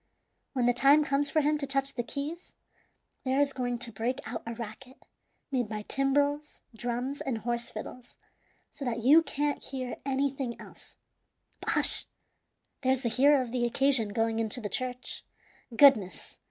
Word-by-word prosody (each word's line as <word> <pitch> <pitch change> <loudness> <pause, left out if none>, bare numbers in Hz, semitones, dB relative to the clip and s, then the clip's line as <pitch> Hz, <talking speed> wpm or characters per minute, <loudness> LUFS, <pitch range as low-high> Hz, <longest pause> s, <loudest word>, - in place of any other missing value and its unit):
When 250 -3 +1
the 245 - +4
time 275 +5 +5
comes 280 +1 +1
for 310 - +2
him 300 +1 +1
to 280 - -2
touch 275 0 0
the 240 - -2
keys, 295 +8 -6 0.7
there 265 +1 +1
is 285 -1 +2
going 245 -2 -2
to 235 0 -4
break 230 +5 -2
out 225 0 -5
a 230 - -4
racket 240 +4 -9 0.5
made 245 -5 0
by 210 -1 -4
timbrels, 285 +4 0
drums, 245 +4 -3
and 255 -4 -2
horse 235 +1 -3
fiddles, 245 +3 -9 0.6
so 285 - -9
that 235 -3 -2
you 295 +6 +7
can't 290 -2 -2
hear 255 -2 -5
anything 270 -2 -2
else. - - -14 0.6
But - - -5
hush! - - +4 0.8
there's 260 -1 +1
the 235 - +1
hero 275 +3 +4
of 240 - -8
the 245 -1 -1
occasion 245 -2 +2
going 225 +1 0
into 225 +2 0
the 210 -3 -4
church. 250 +4 -4 0.5
Goodness! 210 - +4
255 Hz, 165 wpm, -29 LUFS, 235-280 Hz, 0.8 s, you